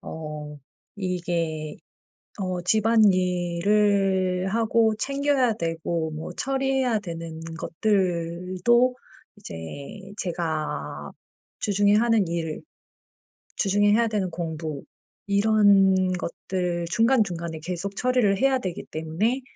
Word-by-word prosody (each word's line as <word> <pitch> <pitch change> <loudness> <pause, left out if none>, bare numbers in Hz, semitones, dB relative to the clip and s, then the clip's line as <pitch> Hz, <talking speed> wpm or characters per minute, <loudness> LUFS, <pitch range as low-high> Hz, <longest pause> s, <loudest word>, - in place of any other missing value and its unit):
어 150 -2 -7 0.4
이게 170 -5 -2 0.7
어 185 -1 -2
집안일을 190 -1 +2
하고 225 -1 +3
챙겨야 275 -4 +1
되고 165 -2 -2
뭐 155 +1 -6
처리해야 265 -3 0
되는 165 -4 -7 0.2
것들도 185 +6 +1 0.4
이제 205 - -9 0.6
제가 165 -4 -3 0.5
주중에 205 0 +3
하는 225 -4 +3
일, 165 -2 -3 1.0
주중에 205 +1 +3
해야 230 +1 +3
되는 200 -4 -1
공부 160 -3 -5 0.4
이런 200 -1 +5 0.2
것들 175 -1 -3
중간중간에 185 -8 +1
계속 185 +4 -4
처리를 245 -6 +2
해야 270 0 +3
되기 185 -7 -5
때문에 175 +12 -1
190 Hz, 200 characters per minute, -25 LUFS, 170-220 Hz, 1.0 s, 이런